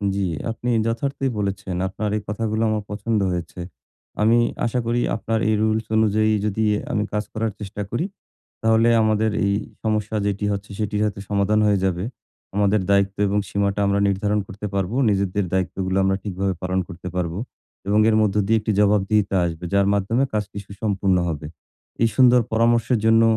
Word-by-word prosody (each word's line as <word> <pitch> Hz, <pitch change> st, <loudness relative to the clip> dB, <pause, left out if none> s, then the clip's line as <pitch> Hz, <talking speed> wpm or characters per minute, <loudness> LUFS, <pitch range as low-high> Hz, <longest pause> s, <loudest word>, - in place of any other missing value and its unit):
জি, 100 Hz, -, -1 dB, 0.3 s
আপনি 120 Hz, +2 st, -4 dB, 0.2 s
যথার্থই 135 Hz, +4 st, -1 dB
বলেছেন। 100 Hz, -2 st, -3 dB
আপনার 105 Hz, +2 st, -3 dB
এই -, -, -4 dB
কথাগুলো 110 Hz, +1 st, -2 dB
আমার 110 Hz, -1 st, -1 dB
পছন্দ 105 Hz, +2 st, -1 dB
হয়েছে। 90 Hz, 0 st, -5 dB, 0.6 s
আমি 115 Hz, +2 st, +5 dB, 0.3 s
আশা 120 Hz, +2 st, 0 dB
করি 120 Hz, +1 st, +1 dB
আপনার 115 Hz, 0 st, -1 dB
এই 110 Hz, -, +3 dB
রুলস 110 Hz, 0 st, +1 dB
অনুযায়ী 110 Hz, 0 st, +3 dB
যদি 105 Hz, +1 st, 0 dB, 0.3 s
আমি 105 Hz, -3 st, +1 dB
কাজ 105 Hz, 0 st, 0 dB
করার 110 Hz, 0 st, -1 dB
চেষ্টা 105 Hz, 0 st, -6 dB
করি, 120 Hz, -, -1 dB, 0.6 s
তাহলে 115 Hz, +1 st, +4 dB
আমাদের 110 Hz, 0 st, +2 dB
এই 100 Hz, -, +2 dB, 0.3 s
সমস্যা 110 Hz, -1 st, -1 dB
যেটি 100 Hz, 0 st, -1 dB
হচ্ছে, 100 Hz, 0 st, -5 dB
সেটির 105 Hz, -1 st, -1 dB
হয়তো 100 Hz, -2 st, -2 dB
সমাধান 100 Hz, +1 st, +2 dB
হয়ে 100 Hz, -1 st, +3 dB
যাবে। 90 Hz, -1 st, 0 dB, 0.5 s
আমাদের 105 Hz, 0 st, +3 dB
দায়িত্ব 100 Hz, 0 st, +2 dB
এবং 100 Hz, +1 st, +1 dB
সীমাটা 100 Hz, 0 st, 0 dB
আমরা 100 Hz, 0 st, +2 dB
নির্ধারণ 100 Hz, +2 st, 0 dB
করতে 100 Hz, +2 st, -7 dB
পারবো। 100 Hz, +4 st, -1 dB
নিজেদের 100 Hz, 0 st, 0 dB
দায়িত্বগুলো 95 Hz, 0 st, -1 dB
আমরা 95 Hz, 0 st, +2 dB
ঠিকভাবে 95 Hz, -1 st, -2 dB
পালন 95 Hz, 0 st, -1 dB
করতে 90 Hz, 0 st, -7 dB
পারবো। 85 Hz, 0 st, -2 dB, 0.5 s
এবং 105 Hz, +1 st, +3 dB
এর 110 Hz, -, +3 dB
মধ্য 105 Hz, -2 st, +1 dB
দিয়ে 110 Hz, +2 st, +3 dB
একটি 110 Hz, +1 st, -1 dB
জবাবদিহিতা 105 Hz, -1 st, +2 dB
আসবে। 80 Hz, 0 st, -5 dB
যার 100 Hz, 0 st, +3 dB
মাধ্যমে 110 Hz, +7 st, +1 dB
কাজটি 105 Hz, -1 st, -3 dB
সুসম্পূর্ণ 100 Hz, -2 st, 0 dB
হবে। 75 Hz, -2 st, -4 dB, 0.6 s
এই 115 Hz, -, +5 dB
সুন্দর 125 Hz, -2 st, +6 dB
পরামর্শের 115 Hz, +2 st, +3 dB
জন্য 110 Hz, 0 st, +5 dB
105 Hz, 165 wpm, -22 LUFS, 100-110 Hz, 0.6 s, সুন্দর